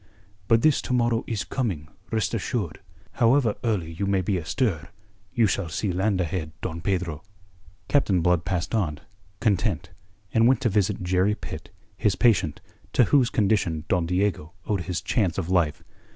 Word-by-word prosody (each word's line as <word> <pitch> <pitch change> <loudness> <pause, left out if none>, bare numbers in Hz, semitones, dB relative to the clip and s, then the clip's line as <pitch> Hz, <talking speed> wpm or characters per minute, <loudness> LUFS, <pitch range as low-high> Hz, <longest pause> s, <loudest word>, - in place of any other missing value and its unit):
"But 115 0 +4
this 155 -3 +4
to - - -3
morrow 120 -1 +2
is 110 -4 -2
coming, 95 - -3 0.2
rest 110 -2 -1
assured. - - -2 0.3
However 120 -1 +3
early 100 -9 -1
you 95 +5 -3
may 100 -1 +2
be 95 +2 0
astir, 85 - -1 0.4
you 115 - +3
shall 95 -3 0
see 95 +4 -1
land 95 +2 +1
ahead, 80 -2 -2
Don 85 -1 -4
Pedro." 90 -4 -1 0.7
Captain 100 -11 +2
Blood 90 0 +2
passed 90 +2 -2
on, 80 -9 0 0.4
content, 100 -4 0 0.4
and 115 +1 +5
went 130 -1 +4
to 120 - +2
visit 100 -1 0
Jerry 95 +3 +2
Pitt, - - -8 0.3
his 100 -3 +1
patient, 100 -11 +2 0.3
to 125 - +5
whose 130 -5 +5
condition 95 -7 +1
Don 90 -3 +1
Diego 90 -3 -1
owed 100 -4 0
his 90 -3 -2
chance 95 -8 0
of 90 -2 -2
life. 85 -5 +1
95 Hz, 165 wpm, -25 LUFS, 85-110 Hz, 0.7 s, and